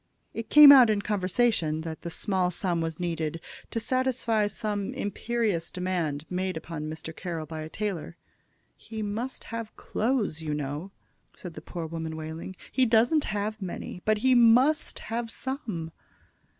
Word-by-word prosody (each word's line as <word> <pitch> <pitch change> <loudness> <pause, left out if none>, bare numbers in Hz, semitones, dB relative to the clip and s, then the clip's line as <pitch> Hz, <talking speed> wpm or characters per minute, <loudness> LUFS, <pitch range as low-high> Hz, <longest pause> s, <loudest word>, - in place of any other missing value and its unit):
It 225 -1 -5
came 300 -1 +11
out 255 -5 +9
in 205 -1 +1
conversation 190 -5 +1
that 160 -1 -6
the 170 - -5
small 185 +1 0
sum 175 -1 -1
was 165 0 -3
needed 165 -2 -2 0.3
to 230 - -2
satisfy 235 -3 +1
some 205 -1 -3
imperious 205 -4 -1
demand 170 -5 -2
made 185 -1 -2
upon 160 -1 -5
Mr. 160 +1 -6
Carroll 170 -4 -4
by 160 0 -6
a 155 - -6
tailor. 180 -4 -4 0.6
"He 220 -1 -7
must 225 +6 -4
have 230 -1 -5
clothes, 220 - -1
you 150 -2 -2
know," 150 +5 -4 0.5
said 180 -3 -8
the - - -9
poor 170 -2 -6
woman, 160 0 -5
wailing. 160 +4 -6 0.2
"He 260 -1 +3
doesn't 240 +8 +4
have 210 +1 -3
many, 180 0 -6
but 215 0 +2
he 260 +4 +3
must 245 +5 +4 0.2
have 230 0 -2
some." 225 - -4
190 Hz, 155 wpm, -27 LUFS, 165-230 Hz, 0.6 s, came